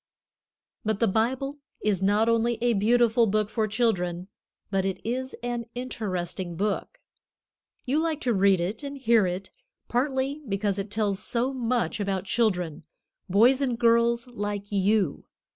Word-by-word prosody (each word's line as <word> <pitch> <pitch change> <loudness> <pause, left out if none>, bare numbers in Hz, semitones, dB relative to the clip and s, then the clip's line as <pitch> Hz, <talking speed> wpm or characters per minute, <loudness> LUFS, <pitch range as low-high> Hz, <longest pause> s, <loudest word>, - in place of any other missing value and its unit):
But 215 -1 -1
the 230 - +4
Bible 255 +7 0 0.2
is 205 -3 +1
not 205 +3 +3
only 230 0 +2
a 240 0 +2
beautiful 230 +2 +3
book 215 +1 0
for 220 -2 0
children, 190 -5 0 0.4
but 195 -1 +1
it 190 -1 -2
is 260 +2 -2
an 240 -1 -2
interesting 185 -8 -4
book. 210 - -2 0.9
You 280 +4 +1
like 320 -2 -1
to 245 - +1
read 195 -2 +4
it 185 +6 -2
and 280 -1 -6
hear 230 -6 +3
it, 185 +2 -4 0.4
partly 265 +3 0
because 200 0 0
it 195 +1 -4
tells 205 -2 0
so 245 +4 -1
much 245 -2 -1
about 195 -2 -1
children, 180 -7 0 0.5
boys 240 +8 +5
and 250 -4 0
girls 235 0 +3
like 205 -4 -5
you. 200 -4 +1
220 Hz, 145 wpm, -26 LUFS, 195-245 Hz, 0.9 s, boys